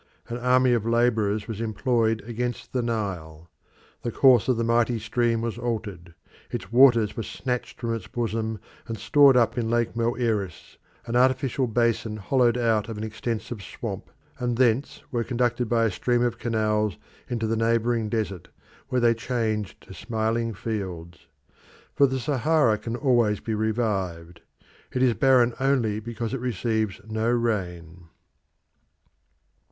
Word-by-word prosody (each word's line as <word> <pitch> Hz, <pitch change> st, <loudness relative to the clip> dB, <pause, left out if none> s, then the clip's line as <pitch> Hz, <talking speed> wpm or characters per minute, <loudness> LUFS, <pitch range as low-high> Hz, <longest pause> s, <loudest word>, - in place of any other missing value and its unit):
An 120 Hz, -, -3 dB
army 125 Hz, 0 st, +3 dB
of 115 Hz, -3 st, +1 dB
labourers 110 Hz, -3 st, +1 dB
was 110 Hz, -1 st, -5 dB
employed 115 Hz, 0 st, 0 dB
against 120 Hz, +1 st, -4 dB
the 125 Hz, -, +1 dB
Nile. 90 Hz, -9 st, -4 dB, 0.5 s
The 120 Hz, -, -3 dB
course 125 Hz, -2 st, +5 dB
of 130 Hz, -3 st, +2 dB
the 115 Hz, -, 0 dB
mighty 115 Hz, +1 st, +2 dB
stream 115 Hz, +1 st, 0 dB
was 115 Hz, 0 st, -3 dB
altered; 100 Hz, -8 st, -4 dB, 0.3 s
its 95 Hz, +3 st, -6 dB
waters 120 Hz, -4 st, +5 dB
were -, -, -3 dB
snatched 125 Hz, +3 st, -4 dB
from 115 Hz, -1 st, -2 dB
its 115 Hz, -5 st, -5 dB
bosom 110 Hz, -2 st, -2 dB, 0.3 s
and 115 Hz, -2 st, -4 dB
stored 135 Hz, +5 st, +5 dB
up 120 Hz, +1 st, +2 dB
in 115 Hz, -1 st, -1 dB
Lake 120 Hz, -1 st, 0 dB
Moeris, 115 Hz, -5 st, -2 dB, 0.3 s
an 120 Hz, 0 st, -3 dB
artificial 130 Hz, +1 st, +2 dB
basin 115 Hz, -1 st, 0 dB
hollowed 120 Hz, +3 st, +2 dB
out 115 Hz, -3 st, +1 dB
of 110 Hz, -, -5 dB
an 105 Hz, -, -4 dB
extensive 110 Hz, 0 st, -4 dB
swamp, -, -, -6 dB, 0.3 s
and 120 Hz, -1 st, -1 dB
thence 125 Hz, +1 st, +1 dB
were 120 Hz, -3 st, 0 dB
conducted 120 Hz, -1 st, 0 dB
by 115 Hz, -1 st, +2 dB
a 110 Hz, -, +1 dB
system 120 Hz, +5 st, +1 dB
of 120 Hz, -1 st, -1 dB
canals 110 Hz, -3 st, 0 dB, 0.3 s
into 115 Hz, -2 st, -1 dB
the 110 Hz, +1 st, 0 dB
neighbouring 115 Hz, 0 st, +1 dB
desert, 105 Hz, -5 st, -3 dB, 0.4 s
which 125 Hz, -2 st, 0 dB
they 115 Hz, -1 st, +5 dB
changed 110 Hz, -3 st, -2 dB
to -, -, -13 dB
smiling 115 Hz, +1 st, -1 dB
fields. 95 Hz, -5 st, -6 dB, 0.7 s
For 140 Hz, -, +4 dB
the 130 Hz, 0 st, -2 dB
Sahara 135 Hz, -3 st, +2 dB
can 115 Hz, 0 st, -4 dB
always 120 Hz, -6 st, +2 dB
be 110 Hz, -, -4 dB
revived. 95 Hz, -7 st, -2 dB, 0.5 s
It 125 Hz, -, 0 dB
is 125 Hz, -2 st, +4 dB
barren 125 Hz, -2 st, +4 dB
only 130 Hz, -6 st, +1 dB
because 115 Hz, +1 st, -5 dB
it 135 Hz, -, -2 dB
receives 110 Hz, -3 st, -1 dB
no 110 Hz, +1 st, -1 dB
rain. 90 Hz, -8 st, -2 dB
115 Hz, 150 wpm, -25 LUFS, 110-120 Hz, 0.7 s, course